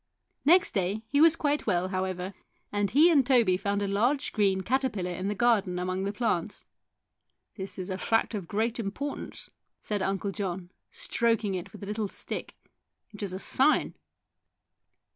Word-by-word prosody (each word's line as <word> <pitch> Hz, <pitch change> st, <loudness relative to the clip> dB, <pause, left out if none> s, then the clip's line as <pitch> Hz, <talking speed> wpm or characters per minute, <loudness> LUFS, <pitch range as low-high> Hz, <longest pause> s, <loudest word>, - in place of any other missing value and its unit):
Next 350 Hz, +5 st, +5 dB
day 195 Hz, +2 st, -1 dB
he 285 Hz, -, +3 dB
was 330 Hz, 0 st, +7 dB
quite 295 Hz, -4 st, 0 dB
well, 185 Hz, -2 st, +1 dB
however, 185 Hz, 0 st, -3 dB, 0.4 s
and 205 Hz, -1 st, 0 dB
he 315 Hz, +6 st, +6 dB
and 285 Hz, -5 st, +5 dB
Toby 240 Hz, -7 st, +4 dB
found 200 Hz, +2 st, -1 dB
a -, -, -1 dB
large 240 Hz, +8 st, +1 dB
green 195 Hz, -3 st, +2 dB
caterpillar 230 Hz, -5 st, -1 dB
in 185 Hz, +2 st, -3 dB
the 205 Hz, -, -1 dB
garden 205 Hz, -5 st, +2 dB
among 185 Hz, +1 st, -2 dB
the 200 Hz, -, -1 dB
plants. 205 Hz, -4 st, -2 dB, 0.4 s
" -, -, -53 dB
This 190 Hz, -2 st, -7 dB
is 185 Hz, 0 st, -4 dB
a 185 Hz, -, -3 dB
fact 225 Hz, +1 st, +1 dB
of 195 Hz, -5 st, -4 dB
great 225 Hz, +5 st, -1 dB
importance," 230 Hz, +7 st, -5 dB, 0.3 s
said 205 Hz, -2 st, -2 dB
Uncle 195 Hz, +1 st, -1 dB
John, 185 Hz, -3 st, -4 dB, 0.2 s
stroking 230 Hz, -, 0 dB
it 180 Hz, -2 st, -5 dB
with 210 Hz, -, -11 dB
a -, -, -4 dB
little 210 Hz, +1 st, -2 dB
stick. -, -, -6 dB, 0.3 s
" -, -, -55 dB
It 205 Hz, -, -9 dB
is 200 Hz, -3 st, -3 dB
a 185 Hz, -, -4 dB
sign 270 Hz, +9 st, +2 dB
205 Hz, 175 wpm, -28 LUFS, 190-240 Hz, 0.4 s, was